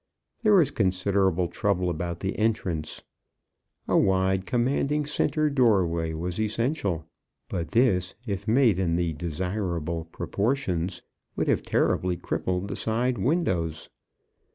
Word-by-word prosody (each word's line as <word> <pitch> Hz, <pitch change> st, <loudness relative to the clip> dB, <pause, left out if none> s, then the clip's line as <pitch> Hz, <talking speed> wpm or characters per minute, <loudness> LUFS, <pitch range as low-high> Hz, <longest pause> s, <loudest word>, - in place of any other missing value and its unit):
There 215 Hz, -3 st, +5 dB
was 170 Hz, -8 st, +4 dB
considerable 95 Hz, -2 st, +1 dB
trouble 90 Hz, +1 st, 0 dB
about 85 Hz, 0 st, -3 dB
the 95 Hz, 0 st, -2 dB
entrance. 95 Hz, -8 st, -1 dB, 0.8 s
A -, -, +1 dB
wide, 95 Hz, 0 st, +2 dB
commanding 140 Hz, +4 st, +1 dB
centre 155 Hz, +1 st, +1 dB
doorway 95 Hz, -, +2 dB
was 90 Hz, +5 st, -3 dB
essential; 110 Hz, -, -1 dB, 0.4 s
but 85 Hz, -2 st, -2 dB
this, 95 Hz, -7 st, +2 dB
if 100 Hz, -2 st, -4 dB
made 115 Hz, -4 st, +4 dB
in 85 Hz, -3 st, +1 dB
the 85 Hz, -2 st, 0 dB
desirable 85 Hz, 0 st, -3 dB
proportions, 95 Hz, +1 st, -2 dB, 0.3 s
would -, -, -1 dB
have -, -, +2 dB
terribly 90 Hz, -1 st, +1 dB
crippled 90 Hz, +2 st, -2 dB
the -, -, -4 dB
side 120 Hz, +1 st, 0 dB
windows. 95 Hz, -, 0 dB
95 Hz, 120 wpm, -26 LUFS, 85-115 Hz, 0.8 s, There